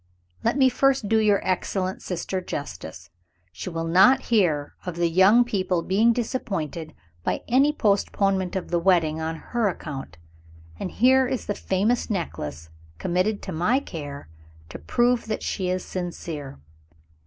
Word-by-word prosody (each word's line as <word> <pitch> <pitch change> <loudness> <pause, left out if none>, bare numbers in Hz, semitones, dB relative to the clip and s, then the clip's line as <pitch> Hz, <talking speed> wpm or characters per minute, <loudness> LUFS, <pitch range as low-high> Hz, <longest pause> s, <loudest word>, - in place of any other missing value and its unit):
Let 235 +4 +1
me 265 -2 +6
first 265 -2 +2
do 225 - +4
your 210 -2 +2
excellent 185 0 -1
sister 185 +1 -3
justice. 90 - -7 0.4
She 185 - -6
will 165 -1 -3
not 190 +11 +6
hear 160 -9 +2
of 180 -2 -5
the 170 0 +1
young 190 +8 +5
people 190 -7 -1
being 210 +7 +3
disappointed 195 - -3 0.3
by - - -1
any 270 +5 +4
postponement 195 -6 +1
of 185 -2 -4
the 175 - +2
wedding, 165 -3 +2
on 160 0 -2
her 230 +6 -1
account. 135 - -7 0.6
And - - -3
here 260 +4 +4
is 260 -1 -3
the 205 - -1
famous 205 +7 0
necklace, 80 - -4 0.3
committed 185 - 0
to 190 - -5
my 180 +11 +2
care, 145 - -8 0.4
to - - -8
prove 240 - +1
that 215 - -3
she 185 -3 -2
is 185 0 -2
sincere." 170 - -5
185 Hz, 150 wpm, -24 LUFS, 165-225 Hz, 0.6 s, me